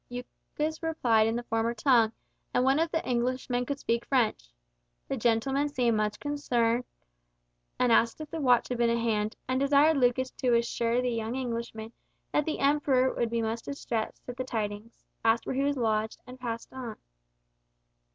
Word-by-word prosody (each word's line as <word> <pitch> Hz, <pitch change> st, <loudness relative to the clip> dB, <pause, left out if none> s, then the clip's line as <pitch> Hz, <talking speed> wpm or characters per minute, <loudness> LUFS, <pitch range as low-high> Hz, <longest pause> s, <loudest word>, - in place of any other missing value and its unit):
Lucas 295 Hz, +5 st, -5 dB
replied 240 Hz, -9 st, +2 dB
in 225 Hz, -, 0 dB
the 240 Hz, -, -2 dB
former 225 Hz, 0 st, -1 dB
tongue, 235 Hz, -2 st, +4 dB, 0.4 s
and 250 Hz, -, +4 dB
one 270 Hz, +3 st, +3 dB
of 330 Hz, +1 st, +1 dB
the 325 Hz, 0 st, -2 dB
Englishmen 250 Hz, 0 st, -1 dB
could 280 Hz, -, -2 dB
speak 235 Hz, -3 st, -1 dB
French. 230 Hz, -, +1 dB, 0.6 s
The -, -, -2 dB
gentleman 265 Hz, +5 st, +1 dB
seemed 245 Hz, -5 st, +1 dB
much 210 Hz, -1 st, -1 dB
concerned, 250 Hz, -5 st, 0 dB, 0.9 s
asked 235 Hz, 0 st, +3 dB
if 310 Hz, -1 st, -8 dB
the 325 Hz, -, -3 dB
watch 250 Hz, -3 st, +3 dB
had 245 Hz, -1 st, -3 dB
been 235 Hz, -1 st, +3 dB
at 235 Hz, -, +2 dB
hand, 220 Hz, -2 st, 0 dB
and 255 Hz, 0 st, 0 dB
desired 285 Hz, +3 st, +4 dB
Lucas 255 Hz, 0 st, +2 dB
to 245 Hz, -2 st, +1 dB
assure 235 Hz, +1 st, +1 dB
the 250 Hz, -, 0 dB
young 230 Hz, +1 st, -2 dB
Englishman 235 Hz, -3 st, -4 dB, 0.4 s
that 300 Hz, -, +1 dB
the 315 Hz, -, -2 dB
Emperor 275 Hz, -2 st, +2 dB
would 235 Hz, -, -1 dB
be 230 Hz, 0 st, -1 dB
much 225 Hz, +1 st, -2 dB
distressed 235 Hz, -5 st, -4 dB
at 245 Hz, 0 st, -6 dB
the 255 Hz, -, -2 dB
tidings, 215 Hz, -2 st, -5 dB, 0.2 s
asked 225 Hz, +1 st, +3 dB
where -, -, -2 dB
he 270 Hz, -, +1 dB
was 285 Hz, 0 st, +1 dB
lodged, 220 Hz, -2 st, 0 dB
and 255 Hz, +1 st, -11 dB
passed 230 Hz, -2 st, -5 dB
on. 245 Hz, -4 st, -6 dB
245 Hz, 175 wpm, -29 LUFS, 230-265 Hz, 0.9 s, tongue